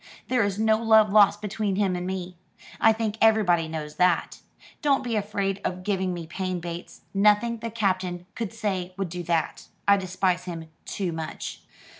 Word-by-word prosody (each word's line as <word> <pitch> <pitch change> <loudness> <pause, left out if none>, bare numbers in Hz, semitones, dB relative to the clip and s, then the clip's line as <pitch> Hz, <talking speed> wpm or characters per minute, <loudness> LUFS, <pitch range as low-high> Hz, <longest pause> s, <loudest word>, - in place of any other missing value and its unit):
There 255 -2 +3
is 200 -1 -1
no 220 0 +3
love 220 -2 +5
lost 205 0 +5
between 210 -1 -1
him 195 -2 +1
and 180 0 -3
me. 185 -1 -4 0.4
I 225 - +6
think 220 -1 -2
everybody 200 -7 +4
knows 155 -1 -6
that. 180 -2 +2 0.4
Don't 280 -2 +2
be 240 -3 -2
afraid 200 -2 -1
of 185 0 -3
giving 190 -2 0
me 175 -2 -5
pain, 185 +2 -3
Bates. 170 0 -7
Nothing 210 +3 +3
the 230 - -4
Captain 185 -5 -1
could 225 -4 -4
say 190 -5 -3
would 195 -2 -2
do 180 +1 -5
that. 165 -2 -1 0.2
I 200 0 +6
despise 185 -1 0
him 165 -3 -6 0.2
too 190 -4 -3
much." 160 -1 -6
195 Hz, 175 wpm, -26 LUFS, 180-215 Hz, 0.4 s, I